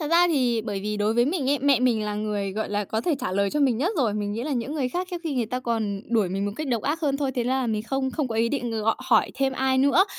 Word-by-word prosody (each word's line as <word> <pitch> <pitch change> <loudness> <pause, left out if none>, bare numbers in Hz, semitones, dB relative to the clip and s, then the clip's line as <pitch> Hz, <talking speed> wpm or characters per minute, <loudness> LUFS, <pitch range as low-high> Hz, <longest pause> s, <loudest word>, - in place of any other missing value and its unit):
Thật 300 - -2
ra 345 +1 +6
thì 250 -7 +2
bởi 205 -3 -3
vì 210 +1 -3
đối 210 +2 +1
với 240 0 +4
mình 285 -3 0
ấy, 285 - +2
mẹ 275 -2 +3
mình 235 -4 +2
là 210 0 -2
người, 205 -2 -2
gọi 220 +2 -3
là, 205 0 0
có 220 +3 -2
thể 315 +5 +1
trả - - -2
lời 200 +1 +1
cho 295 - -1
mình 260 -5 +3
nhất 350 +10 +1
rồi. 230 -7 +1
Mình 205 -1 -2
nghĩ 230 +3 -3
là 295 +1 -2
những 260 +4 -2
người 265 -4 0
khác 360 +5 -3
trước 355 - -3
khi 300 -4 -2
người 240 -3 0
ta 250 +2 -3
còn 220 -5 -2
đuổi 215 -5 +3
mình 195 +2 -2
một 205 - -2
cách 310 - -3
độc 235 -4 0
ác 310 +3 -1
hơn 280 -4 +1
thôi. 275 -2 -1
Thế 245 - 0
ra 260 +2 +1
là 250 - -1
mình 215 -2 -1
không 265 +2 -1
không 290 -4 -2
có 225 - -4
ý 230 +1 +2
định 245 -3 -2
gọi 225 0 +1
hỏi 230 -4 +3
thêm 270 0 0
ai 265 0 +1
nữa. 280 +8 +5
245 Hz, 330 wpm, -25 LUFS, 215-275 Hz, -, ra